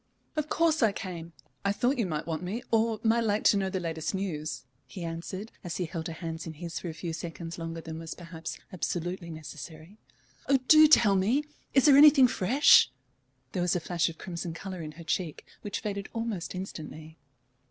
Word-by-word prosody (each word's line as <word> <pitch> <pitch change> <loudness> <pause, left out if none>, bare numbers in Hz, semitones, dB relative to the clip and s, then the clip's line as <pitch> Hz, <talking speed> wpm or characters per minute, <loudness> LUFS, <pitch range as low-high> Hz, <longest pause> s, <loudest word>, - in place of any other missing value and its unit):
"Of 305 -1 -2
course 325 -2 +2
I 220 -4 +4
came. 170 -5 -6 0.3
I 200 - +2
thought 245 +6 +1
you 220 - +1
might 155 -3 -3
want 160 -1 -3
me, 205 +7 -4
or 225 -1 +2
might 225 +1 +4
like 210 -1 +1
to - - +5
know 195 -1 0
the 190 0 -2
latest 165 +1 -3
news," 155 -8 -3 0.2
he 180 - -7
answered, 170 +5 -5
as 175 -2 -4
he 180 - -1
held 160 0 -5
her 165 - -5
hands 165 0 -6
in 160 - -5
his 165 +1 -6
for 175 - -5
a - - -5
few 170 -1 -4
seconds 165 +1 -6
longer 165 0 -5
than 160 0 -7
was 165 -1 -6
perhaps 165 -2 -7 0.2
absolutely 175 0 -3
necessary. 160 +4 -9 0.5
"Oh, 275 - +6
do 310 0 +9
tell 235 -9 +6
me! 220 +10 +2 0.3
Is 270 - +5
there 280 -2 +8
anything 285 -3 +8
fresh?" 240 - +5 0.6
There 180 - -2
was 175 +1 +2
a - - +1
flash 170 0 0
of 165 - -10
crimson 170 -2 -5
colour 185 +1 -6
in 155 -1 -7
her 170 +2 -11
cheek, 165 -1 -2 0.2
which 205 - -4
faded 200 -2 -4
almost 220 -7 -3
instantly. 160 -4 -8
180 Hz, 200 wpm, -29 LUFS, 165-210 Hz, 0.6 s, do